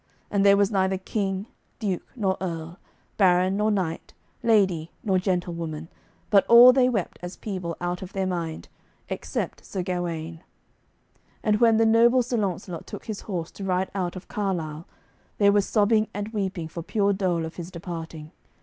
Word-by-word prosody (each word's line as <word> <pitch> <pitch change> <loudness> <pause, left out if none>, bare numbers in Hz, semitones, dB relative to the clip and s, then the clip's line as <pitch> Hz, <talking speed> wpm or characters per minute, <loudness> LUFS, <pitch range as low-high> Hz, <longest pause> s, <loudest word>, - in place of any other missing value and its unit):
And 200 -1 +2
there 200 0 +6
was 200 0 +3
neither 190 -1 +1
king, 195 0 -2 0.3
duke 195 -5 -3
nor 195 -6 0
earl, 170 -1 -5 0.4
baron 185 -1 +4
nor 210 +1 +2
knight, 185 -6 -2 0.3
lady 190 -8 +2
nor 190 -3 +2
gentlewoman, 170 -4 -3 0.4
but 200 -2 +6
all 240 +2 +9
they 255 -1 +4
wept 210 -8 -2
as 180 +1 -7
people 185 -5 -4
out 175 0 -3
of 190 0 -8
their 195 -1 -1
mind, 170 -3 -3 0.4
except - - -4
Sir 190 -2 -4
Gawaine; 170 -3 -4 1.0
and 210 -2 +2
when 230 -2 +5
the 225 - +4
noble 235 +3 +5
Sir 240 0 -2
Launcelot 185 -4 -3
took - - -8
his 215 -3 -5
horse, 175 -5 -4
to 200 - -9
ride 185 0 0
out 185 -2 -2
of 185 - -9
Carlisle, 170 -6 -3 0.5
there 200 -1 +5
was 205 -1 +2
sobbing 215 0 +3
and 205 +1 -3
weeping 190 -6 -3
for 170 +1 -7
pure 200 +3 +1
dole 180 -4 0
of 160 - -9
his 175 -1 -6
departing. 165 -3 -7
190 Hz, 170 wpm, -25 LUFS, 170-205 Hz, 1.0 s, all